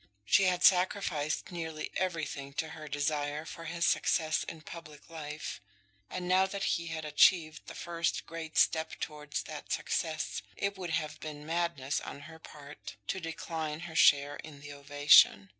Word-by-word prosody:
She 195 - +5
had 180 -1 +1
sacrificed 180 -5 +2
nearly 160 -3 -5
everything 155 -6 -2
to 160 +2 -2
her 155 -1 -9
desire 145 +1 -1
for 165 0 -8
his 170 +1 -1
success 155 -2 +2
in 160 - -8
public 155 -1 -11
life, 150 -7 -6 0.5
and 180 -1 -4
now 185 +1 +4
that 195 0 -4
he 170 0 0
had 160 -1 -4
achieved 155 +1 +3
the - - -8
first 170 -1 -2
great 165 -1 -7
step 160 -1 +2
towards 150 -1 -4
that 150 -2 -8
success, 155 -2 -1 0.2
it 200 0 -1
would 180 -2 -5
have 160 -2 -2
been 150 -1 -7
madness 165 -4 -1
on 140 - -8
her 160 +2 -12
part 150 -2 -11
to 190 - -1
decline 160 -2 -4
her 170 -2 -8
share 145 0 +5
in 150 -2 -10
the 145 0 -9
ovation. 140 -8 +5
155 Hz, 160 wpm, -31 LUFS, 150-170 Hz, 0.5 s, She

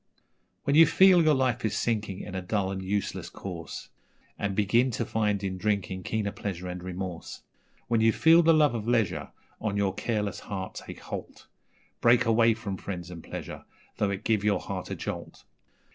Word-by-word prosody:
'When 140 - +1
you 165 0 +8
feel 185 0 +6
your 155 -1 +4
life 130 -3 +1
is 110 - 0
sinking 105 -5 -1
in 100 - -8
a 95 - -2
dull 95 +1 -1
and 95 0 -4
useless 100 +2 -2
course, 85 -4 -7 0.5
And 100 -1 -2
begin 115 +5 +3
to 120 - -2
find 105 -2 0
in 95 -1 -3
drinking 100 -2 -1
keener 105 +1 -2
pleasure 90 -3 -5
and 90 0 -5
remorse 90 -1 -6 0.4
When 115 -1 +2
you 115 0 +5
feel 165 +7 +6
the 165 0 +5
love 150 -4 +4
of 115 -2 -4
leisure 120 -4 +1 0.3
on 105 -2 -2
your 100 -2 +1
careless 105 -2 -2
heart 95 -2 -6
take - - -10
holt, - - -7 0.6
Break 120 +1 +5
away 115 0 +4
from 105 -4 -5
friends 90 -2 -6
and 85 -2 -9
pleasure, - - -7 0.3
though 100 - +1
it 100 +1 -4
give 110 -3 +1
your 105 -1 +2
heart - - -5
a - - -3
jolt. - - -6
105 Hz, 185 wpm, -28 LUFS, 95-115 Hz, 0.6 s, you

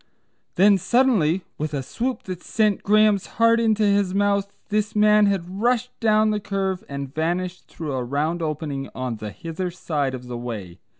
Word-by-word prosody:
Then 195 +1 +5
suddenly, 195 -8 +2 0.2
with 155 0 -2
a 135 - -2
swoop 245 - -3
that 185 -2 -6
sent 215 -3 +1
Graham's 210 -1 +3
heart 230 +1 +5
into 220 -2 +2
his 200 -2 +2
mouth, 200 0 +1 0.2
this 210 0 -1
man 210 0 +5
had 190 0 -2
rushed 245 +1 +1
down 215 -1 +3
the 210 - 0
curve 195 -2 -2
and 140 -1 -5
vanished 175 +3 -2
through 155 -4 -6
a 130 -1 -1
round 150 +7 -1
opening 150 -3 -3
on 125 -3 -3
the 105 0 -6
hither 165 - -5
side 150 -6 -2
of 125 -1 -9
the 120 -1 -6
way. 105 -8 -6
185 Hz, 175 wpm, -23 LUFS, 150-210 Hz, 0.2 s, Then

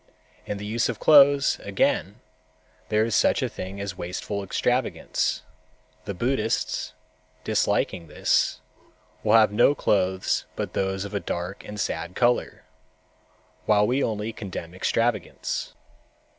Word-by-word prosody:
In 105 - -3
the 105 - -7
use 115 +3 0
of 115 - -4
clothes, 140 -2 +6
again, - - 0 0.7
there 110 +1 +3
is 115 - -3
such - - +3
a - - +1
thing 95 +2 -7
as 100 -2 -4
wasteful 90 +3 -4
extravagance. 125 +6 -1 0.6
The 100 - -4
Buddhists, 115 +2 -1 0.5
disliking 85 - 0
this, 75 - +1 0.6
will - - +3
have 110 -2 +6
no 120 +7 +4
clothes 95 -6 0
but - - -4
those 95 0 -1
of 100 - -8
a 100 - 0
dark 90 +1 -5
and 105 0 -8
sad 85 -1 -3
color, 120 0 +1 1.0
while 105 -1 +4
we 130 +5 +1
only 110 0 -2
condemn 90 -5 -7
extravagance. 115 +4 -1
105 Hz, 130 wpm, -25 LUFS, 95-115 Hz, 1.0 s, clothes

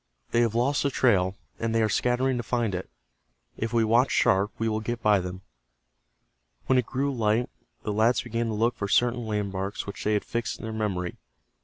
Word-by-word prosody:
"They 120 - +3
have 115 -2 +1
lost 135 +4 +2
the 140 - +1
trail, 95 -8 +2 0.2
and 115 0 -1
they 115 - +3
are - - +3
scattering 125 +4 +1
to - - -1
find 115 -2 -1
it. 90 0 -4 0.7
If 115 0 -3
we 115 -1 +3
watch 120 +4 +4
sharp 95 +2 +3
we 115 - -1
will 110 -1 0
get 115 +2 -4
by 105 -2 +5
them." 90 +1 -6 1.2
When 130 - +4
it 125 - -2
grew 140 +2 -1
light 115 0 +1 0.3
the 105 - -2
lads 110 +4 +3
began 115 0 -2
to 110 - -2
look 115 +3 +2
for 100 - -3
certain 120 +2 +2
landmarks 100 -2 -2
which 100 - -7
they 105 - +1
had 105 - 0
fixed 115 0 -3
in - - -12
their 110 0 -4
memory. 95 -5 -2
110 Hz, 205 wpm, -27 LUFS, 105-120 Hz, 1.2 s, by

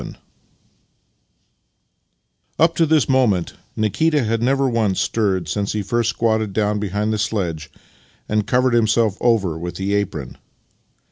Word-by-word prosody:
VII - - -9 2.4
Up 165 +1 +3
to 165 - +2
this 155 -3 +3
moment 120 -10 +1 0.2
Nikita 145 +7 +1
had 115 0 -1
never 135 +2 +2
once 110 -6 0
stirred 95 -6 0
since 100 -1 -2
he 105 -1 -2
first 115 +3 0
squatted 110 -3 0
down 105 0 0
behind 105 +2 -1
the 110 - -2
sledge 90 -8 -2 0.6
and 105 -1 0
covered 125 +1 +2
himself 110 -2 +2
over 100 -9 +1
with 85 0 -5
the 95 +2 -2
apron. 85 -10 -3
110 Hz, 135 wpm, -20 LUFS, 100-120 Hz, 2.4 s, Up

